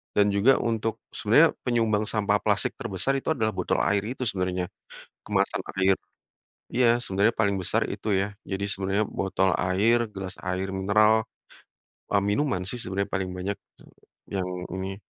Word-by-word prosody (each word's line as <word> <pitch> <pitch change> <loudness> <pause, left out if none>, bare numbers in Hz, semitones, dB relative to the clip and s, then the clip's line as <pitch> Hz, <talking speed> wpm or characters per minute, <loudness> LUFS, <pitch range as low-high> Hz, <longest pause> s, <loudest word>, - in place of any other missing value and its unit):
dan 105 0 +4
juga 100 +6 +5
untuk 115 -1 -1 0.2
sebenarnya - - +5 0.2
penyumbang 110 -3 +2
sampah 105 -1 +1
plastik 105 -2 +1
terbesar 115 +4 -1
itu - - -15
adalah 110 -4 0
botol 95 -3 -1
air 100 - +2 0.2
itu 130 - -4
sebenarnya, 90 -5 -1 0.6
kemasan - - 0 0.2
air. 95 0 +4 0.8
Iya, 125 0 +4
sebenarnya 100 -1 +2
paling 100 -2 +3
besar 95 -2 0
itu - - -6
ya. 95 - 0 0.2
Jadi, 95 +1 -2
sebenarnya 100 +1 0
botol 95 0 0
air, 100 +6 +3
gelas 95 -2 -6
air 90 +1 -2
mineral, 105 +3 +4 0.9
mmm, 100 - +3
minuman 105 -2 +1
sih, 120 +5 -4
sebenarnya 100 +1 -2
paling 95 -1 -1
banyak 95 +3 -2 0.8
yang 90 -1 -1 0.2
ini 95 +1 -4
100 Hz, 145 wpm, -26 LUFS, 95-110 Hz, 0.9 s, juga